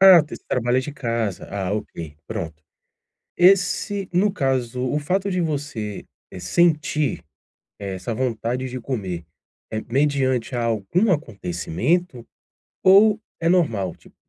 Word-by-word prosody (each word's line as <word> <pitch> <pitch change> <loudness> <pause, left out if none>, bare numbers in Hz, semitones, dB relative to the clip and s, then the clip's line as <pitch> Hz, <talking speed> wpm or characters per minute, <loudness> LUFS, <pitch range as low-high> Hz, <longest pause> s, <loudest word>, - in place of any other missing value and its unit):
Ah, 190 -3 +10
você 150 - -8
trabalho 125 +1 +2
de 145 +2 -6
casa. 115 -8 -2
Ah, 100 -1 -2
ok, 85 -8 -5
pronto. 80 -1 -5 0.8
Esse 195 +2 +3
no 195 +3 +3
caso, 130 - -1
o 145 +4 0
fato 190 +6 0
de 180 - 0
você, 145 - -3 0.3
eh, - - -8
sentir 155 - +1 0.6
,eh, 100 -2 -4
essa 110 +5 -4
vontade 125 +1 -1
de 125 0 -5
comer, 95 - -4 0.5
eh, 110 0 -3
mediante 130 -3 +1
algum 120 - +1
acontecimento 120 - -1 0.6
ou 210 +3 +6 0.2
é 165 - +2
normal, 115 - +2
tipo, - - -21
130 Hz, 125 wpm, -23 LUFS, 110-170 Hz, 0.8 s, Ah